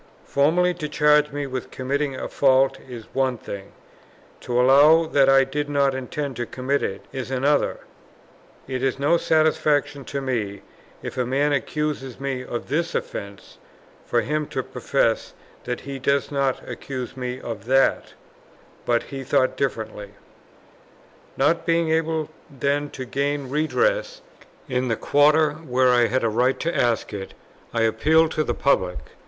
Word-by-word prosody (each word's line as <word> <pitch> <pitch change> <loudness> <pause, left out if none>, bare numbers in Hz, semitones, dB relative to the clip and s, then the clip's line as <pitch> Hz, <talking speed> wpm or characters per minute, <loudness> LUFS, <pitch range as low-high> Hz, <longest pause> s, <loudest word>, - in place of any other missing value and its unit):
Formally 170 +6 +2
to 155 -3 -5
charge 150 0 +3
me 145 0 -3
with 130 -2 -5
committing 140 +2 -2
a - - -4
fault 135 -1 +3
is 120 -3 -8
one 130 -2 +1
thing; 100 -2 -8 0.7
to 120 0 -1
allow 145 +6 +6
that 140 -4 +3
I 135 0 +6
did 145 +2 -3
not 140 -1 +2
intend 130 0 -4
to 120 -1 -3
commit 135 +2 -1
it, 100 0 -4
is 130 -2 -5
another; 140 +3 +1 0.9
it 130 -1 -3
is 135 -1 0
no 145 +5 +3
satisfaction 150 -3 +1
to 140 - -4
me, 115 -7 -3 0.4
if - - -5
a 125 - +1
man 145 +3 +1
accuses 140 -3 -2
me 135 -2 -3
of 120 -1 -5
this 165 +4 -1
offence, 100 0 -6 0.4
for 120 - +1
him 150 +6 -2
to - - -3
profess - - -1 0.3
that 125 0 -3
he 135 0 -6
does 140 +2 0
not 140 -2 -1
accuse 125 +1 -6
me 125 -1 -4
of 115 -4 -7
that; 135 +2 +2 0.7
but 120 -1 +2
he 135 -1 -7
thought 130 0 +2
differently. 110 -6 -4 1.2
Not 165 +2 +2
being 165 -1 +1
able 160 -1 0 0.2
then 140 +2 -1
to 130 - -7
gain 140 +1 -2
redress - - 0 0.4
in 130 -1 -1
the 115 - +1
quarter, 150 +4 +4
where 130 -4 +1
I 120 -1 +4
had 130 +1 0
a - - +3
right 125 +4 +1
to 170 +1 -1
ask 120 -2 0
it, 95 -1 -7 0.4
I 115 - 0
appealed 155 +9 +3
to 155 - 0
the - - -2
public. 95 -10 +1
135 Hz, 155 wpm, -23 LUFS, 125-150 Hz, 1.2 s, allow